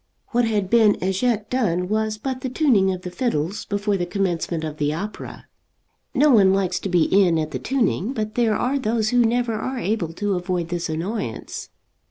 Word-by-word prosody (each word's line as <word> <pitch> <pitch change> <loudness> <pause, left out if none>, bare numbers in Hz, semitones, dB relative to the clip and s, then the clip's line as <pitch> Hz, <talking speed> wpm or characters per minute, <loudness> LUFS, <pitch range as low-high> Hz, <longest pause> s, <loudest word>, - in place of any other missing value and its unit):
What 240 0 +2
had 210 -4 0
been 220 -1 +5
as 190 +1 -1
yet 225 -4 +1
done 180 -8 0
was 215 +1 -1
but 255 +3 -4
the 260 - -3
tuning 245 -9 +3
of 180 -1 -5
the 180 - -5
fiddles 185 - -2
before 205 0 -1
the 175 - -1
commencement 175 -4 -1
of 155 -1 -5
the 145 0 0
opera. 195 +7 -6 0.7
No 290 +2 +5
one 195 -5 +5
likes 185 -2 0
to 195 - -4
be 175 -3 +3
in 185 -3 +3
at 155 -1 -2
the 130 - -3
tuning, 240 - 0
but 215 -4 -3
there 225 -2 +2
are 265 +5 0
those 225 -3 0
who 245 0 +2
never 235 0 +1
are 255 +5 -3
able 205 -8 -1
to 205 +3 -1
avoid 180 -2 -2
this 175 -1 -3
annoyance. 165 - -4
205 Hz, 200 wpm, -22 LUFS, 180-230 Hz, 0.7 s, been